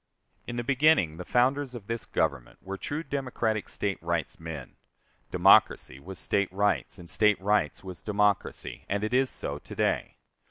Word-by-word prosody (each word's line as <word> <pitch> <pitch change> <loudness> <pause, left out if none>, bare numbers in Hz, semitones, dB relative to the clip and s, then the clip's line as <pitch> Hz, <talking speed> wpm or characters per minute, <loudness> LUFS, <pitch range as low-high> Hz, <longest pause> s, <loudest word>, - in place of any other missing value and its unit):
In 120 - -4
the 120 - -2
beginning 135 - +3
the 90 - -5
founders 130 +2 +1
of 110 -5 -8
this 115 +1 -4
Government 65 -4 -1
were 95 +1 -5
true 145 +10 -4
democratic 125 -7 -2
State 100 -1 -2
rights 85 -3 -2
men. 80 -5 -8 0.5
Democracy 65 - +4
was 95 +6 -9
State 100 +3 0
rights, 105 +2 0
and 85 -2 -11
State 105 +5 +3
rights 100 -5 +1
was 90 -5 -8
democracy, 105 -1 0
and 100 +1 -1
it 110 - -2
is 130 +1 +3
so - - -5
to - - -11
day. - - 0
105 Hz, 165 wpm, -28 LUFS, 90-120 Hz, 0.5 s, Democracy